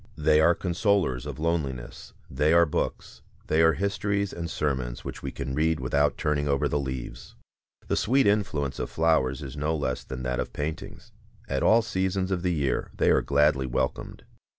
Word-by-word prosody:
They 75 0 +4
are 85 +2 +5
consolers 95 - 0
of - - -6
loneliness, 75 -7 -3
they 75 +4 +1
are 85 0 +6
books, 75 - -4 0.2
they 80 - +2
are 80 0 +5
histories 100 +2 -1
and 85 -1 -5
sermons 65 -6 -2
which - - -6
we 70 - -4
can 65 - -5
read 80 +2 +1
without 70 +3 +1
turning 75 -1 0
over 70 -1 +1
the 75 - 0
leaves. 65 -3 -6 0.5
The - - 0
sweet 135 +4 +2
influence 80 -10 0
of - - -3
flowers 80 -4 +1
is 65 0 -7
no 75 +2 -1
less 65 -4 -2
than 65 -1 -7
that 65 0 -2
of - - -4
paintings. 75 +2 -6 0.4
At - - -1
all 115 +1 +5
seasons 95 -2 -1
of 90 -2 0
the 90 0 0
year 70 -6 -1
they - - +3
are - - +4
gladly 70 -2 +2
welcomed. - - -3
75 Hz, 180 wpm, -26 LUFS, 70-85 Hz, 0.5 s, are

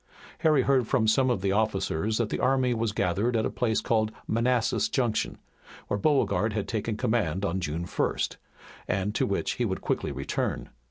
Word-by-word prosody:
Harry 150 -4 +4
heard 130 -3 +2
from 115 -4 +2
some 130 +4 +3
of 120 -7 0
the 95 0 +1
officers 105 -1 0
that 115 -3 0
the - - -2
army 130 -1 +2
was 115 -1 -1
gathered 105 +4 0
at 110 - +1
a - - -1
place 110 -3 0
called 110 -2 +1
Manassas 115 +1 +1
Junction, 120 -5 0 0.5
where 100 - 0
Beauregard 110 -6 +2
had 105 -2 -2
taken 110 -1 -2
command 105 -7 0
on 95 0 -1
June 85 0 -3
1st, - - -1 0.5
and 95 +2 -1
to - - +1
which - - -1
he - - -2
would - - -2
quickly - - -1
return. 70 0 -3
110 Hz, 180 wpm, -27 LUFS, 100-120 Hz, 0.5 s, Harry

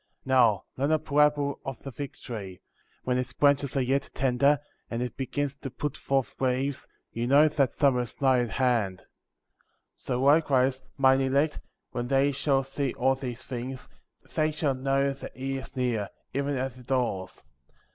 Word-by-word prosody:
38. - - -15
Now 115 -6 +4
learn 140 +3 +1
a - - +5
parable 150 -1 +2
of 135 -3 -6
the 135 - -6
fig 140 +2 -6
tree: 100 -7 -7 0.2
— - - -38
when 125 0 +1
its 125 - -4
branches 140 -1 +2
are - - +3
yet 135 +2 0
tender, 135 +2 +3 0.3
and 115 - -3
it 125 - -5
begins 140 +1 -2
to 135 - -6
put 145 +3 -4
forth 135 -1 -1
leaves, 130 +2 0 0.2
you 120 +1 -2
know 145 +4 +6
that 140 -4 +1
summer 135 -4 +3
is 120 -2 -7
nigh 130 -2 +4
at 120 -1 0
hand; 115 -5 +1
39. - - -23 0.9
So 125 +1 -2
likewise, 135 -3 +4 0.2
mine 135 0 +5
elect, 140 +3 +1 0.3
when 120 0 -3
they 135 +2 +3
shall 140 -1 +1
see 135 -1 -3
all 130 +2 +3
these 130 -2 -5
things, 130 +1 -6 0.5
they 155 0 +3
shall 150 -2 0
know 135 +1 +1
that 135 - -10
he 135 +1 -2
is 130 - -9
near, 120 -6 -1 0.2
even 140 0 -1
at 130 0 -2
the 130 - -14
doors; 120 -8 -1
40. - - -23
135 Hz, 185 wpm, -28 LUFS, 125-140 Hz, 0.9 s, know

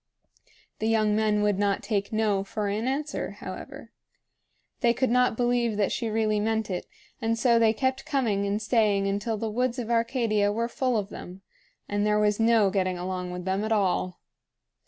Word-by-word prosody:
The 220 - -1
young 215 -2 +2
men 210 -1 +2
would 205 -2 +1
not 200 -1 +1
take 200 -3 -1
"No!" 215 -3 +1
for 205 +1 -3
an 215 +4 -2
answer, 290 +3 -2
however. - - -9 0.9
They 240 -2 +3
could 260 -1 +1
not 250 -2 +3
believe 240 -3 +1
that 205 -2 +1
she 230 - -2
really 215 -1 +1
meant 220 -1 -1
it, 180 - -4 0.3
and 225 0 0
so 235 -1 +4
they 225 -1 +5
kept 260 +3 -1
coming 235 -10 0
and 200 +1 0
staying 210 -3 +2
until 205 +3 -1
the 225 - -3
woods 250 +2 0
of 240 -2 -3
Arcadia 230 -3 +1
were 230 +2 -1
full 250 0 0
of 205 -1 -2
them, 185 0 -10 0.4
and 205 0 -1
there 210 0 +2
was 210 0 +2
no 225 -3 +4
getting 185 -2 0
along 180 0 -4
with 180 0 -6
them 190 +2 0
at 220 - -3
all. 185 -3 0
215 Hz, 185 wpm, -26 LUFS, 200-235 Hz, 0.9 s, they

